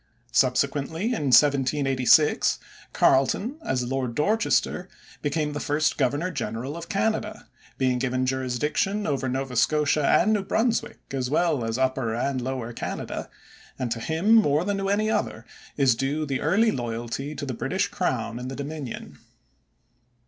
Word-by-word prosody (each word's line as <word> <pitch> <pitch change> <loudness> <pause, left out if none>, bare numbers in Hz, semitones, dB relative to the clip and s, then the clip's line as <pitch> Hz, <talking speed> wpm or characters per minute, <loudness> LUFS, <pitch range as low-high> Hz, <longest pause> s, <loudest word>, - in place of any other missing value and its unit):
Subsequently, 140 +5 +1
in 145 - -1
1786, 135 +1 +4 0.3
Carleton, 200 - +2
as 130 - -1
Lord 125 -1 -2
Dorchester, 190 - +1 0.3
became 150 0 -1
the 145 - -3
first 150 +1 +1
governor 145 +7 0
general 125 -1 -4
of 170 0 -8
Canada, 215 +1 -1 0.3
being 130 -2 +1
given 130 0 0
jurisdiction 135 - -1
over 135 -3 -1
Nova 130 0 -3
Scotia 150 +3 +2
and 215 - +4
New 210 - +1
Brunswick 225 +3 0
as 130 -2 -2
well 155 -3 +1
as 115 +1 -2
Upper 130 -3 0
and 130 +2 -1
Lower 125 -2 -4
Canada, - - -5 0.5
and 125 -2 -3
to 115 - -1
him 160 - +1
more 160 -7 +4
than 200 0 -1
to 195 0 -1
any 210 +2 +1
other 120 - -2 0.3
is 135 -3 +4
due 140 +5 -1
the 135 -3 -2
early 215 +8 +3
loyalty 120 - -4
to 145 - -5
the 130 - -3
British - - -1
crown 115 +1 -2
in 125 - -5
the 135 - -5
Dominion. 140 -3 -6
140 Hz, 150 wpm, -25 LUFS, 130-165 Hz, 0.5 s, 1786